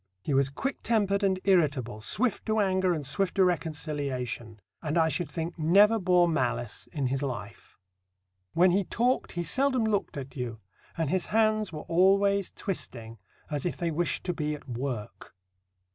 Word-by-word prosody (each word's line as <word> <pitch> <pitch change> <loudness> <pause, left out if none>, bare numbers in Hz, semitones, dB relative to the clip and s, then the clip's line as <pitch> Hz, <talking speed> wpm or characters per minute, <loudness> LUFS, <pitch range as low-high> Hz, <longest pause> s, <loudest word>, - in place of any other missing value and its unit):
He 145 - -1
was 135 0 +3
quick 270 - -4
tempered 205 -3 +1
and 190 -1 +2
irritable, 140 - +1
swift 220 - 0
to 220 0 +1
anger 190 -2 +2
and 155 -4 -2
swift 180 +7 0
to 190 - +5
reconciliation, 140 -9 -3 0.2
and 155 +1 -1
I 160 -1 +4
should 160 +3 -1
think 165 +1 -5
never 200 +8 +5
bore 180 -2 +4
malice 120 -7 -2
in 145 -4 -2
his 135 +2 -1
life. 120 -6 -6 0.8
When 180 +2 +5
he 195 +3 +2
talked 245 +7 0
he 175 - -2
seldom 260 +4 +1
looked 205 -8 -1
at 135 -1 -7
you, 120 -4 -4 0.4
and 160 -3 0
his 185 -2 0
hands 215 -2 +2
were 155 -2 -6
always 195 +2 +3
twisting, 115 - -5 0.3
as 145 -2 -1
if 175 - -2
they 170 -1 -1
wished 170 +2 -1
to 180 - -1
be 150 -2 -2
at 145 - -13
work. 120 -6 -5
170 Hz, 170 wpm, -28 LUFS, 140-195 Hz, 0.8 s, to